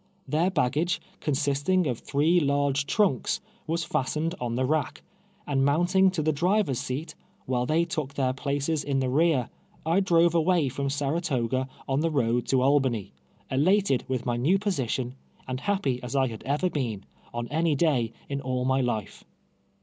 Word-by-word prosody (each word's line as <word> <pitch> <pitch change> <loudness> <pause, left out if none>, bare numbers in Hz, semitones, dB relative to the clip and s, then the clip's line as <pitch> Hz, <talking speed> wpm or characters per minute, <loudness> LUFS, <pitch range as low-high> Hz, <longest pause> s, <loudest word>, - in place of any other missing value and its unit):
Their 165 +4 +2
baggage, 160 +1 0 0.2
consisting 145 +5 +1
of 125 -4 -1
three 155 +5 +2
large 140 -1 +1
trunks, 200 - +1 0.3
was 165 +1 0
fastened 155 +3 -1
on 120 -1 -2
the 130 +1 +1
rack, 155 +3 -1 0.4
and 135 -2 +1
mounting 175 +7 +4
to 180 -4 -2
the 155 - +2
driver's 175 - +1
seat, 150 +6 -4 0.3
while 125 -1 0
they 165 +4 +2
took 155 -5 -4
their 130 -2 +1
places 145 +3 -1
in 140 -1 0
the 130 -1 0
rear, 150 -4 +2 0.4
I 165 +4 +3
drove 170 -3 +4
away 170 -3 +2
from 140 +2 -2
Saratoga 135 -3 -1 0.2
on 135 +1 +1
the 165 +2 +1
road 120 -5 0
to 130 -1 +2
Albany, 130 -8 +1 0.4
elated 155 +1 +3
with 130 -2 -2
my 120 -1 0
new 155 +11 +3
position, 130 - -2 0.3
and 130 0 -3
happy 165 -10 -1
as 125 +1 -5
I 135 -1 +3
had 110 -2 -8
ever 145 +7 +1
been, 115 -9 -3 0.3
on 120 0 -4
any 160 0 +1
day 135 -7 +1 0.2
in 140 0 -3
all 125 -1 -2
my 130 +1 +2
life. 110 -5 -3
140 Hz, 165 wpm, -27 LUFS, 130-165 Hz, 0.4 s, mounting